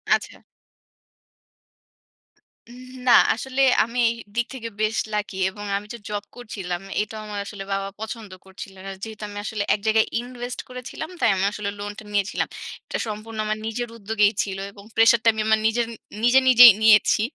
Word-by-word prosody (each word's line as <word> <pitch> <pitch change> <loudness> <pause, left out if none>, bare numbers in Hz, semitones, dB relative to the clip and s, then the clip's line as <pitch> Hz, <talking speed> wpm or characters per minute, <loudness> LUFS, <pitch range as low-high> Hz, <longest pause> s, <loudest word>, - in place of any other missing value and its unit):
আচ্ছা। - - -7 2.3
উম 245 +2 -12 0.2
না, - - +6 0.2
আসলে 265 +3 -3 0.2
আমি 235 +2 -4
এই - - -1 0.2
দিক 240 0 +1
থেকে 230 -3 -6
বেশ 215 0 +1 0.2
লাকি 210 -1 -2
এবং 205 +1 -9
আমি 205 +1 -8
যে - - -7
জব 205 -1 -3
করছিলাম। 195 -7 -5 0.2
এটাও 215 +1 -5
আমার 210 -1 -5
আসলে 200 -1 -7
বাবা 195 0 -2
পছন্দ 220 -1 -7
করছিলেন। 190 0 -11
আর 195 - -6
যেহেতু 220 -1 -7
আমি 205 - -9
আসলে 215 -2 -2
এক - - -1
জায়গায় 220 0 +4
invest 245 0 -6
করেছিলাম 250 +5 -7
তাই - - +3
আমি 190 +1 0
আসলে 210 -1 -4
লোনটা 205 +1 -6
নিয়েছিলাম। 200 0 0 0.4
এটা - - -3
সম্পূর্ণ 215 +1 -6
আমার 215 0 -1
নিজের 240 +2 -3
উদ্যোগেই 210 0 +2
ছিলো 195 -1 -5
এবং 200 0 -14
প্রেশারটা 225 0 +5
আমি 220 - -2
আমার 220 0 +4
নিজেরন 230 +1 +1 0.3
নিজে, 245 +2 +6
নিজেই 245 -1 +11
নিয়েছি। 215 -1 +5
220 Hz, 165 wpm, -23 LUFS, 205-235 Hz, 2.3 s, নিজেই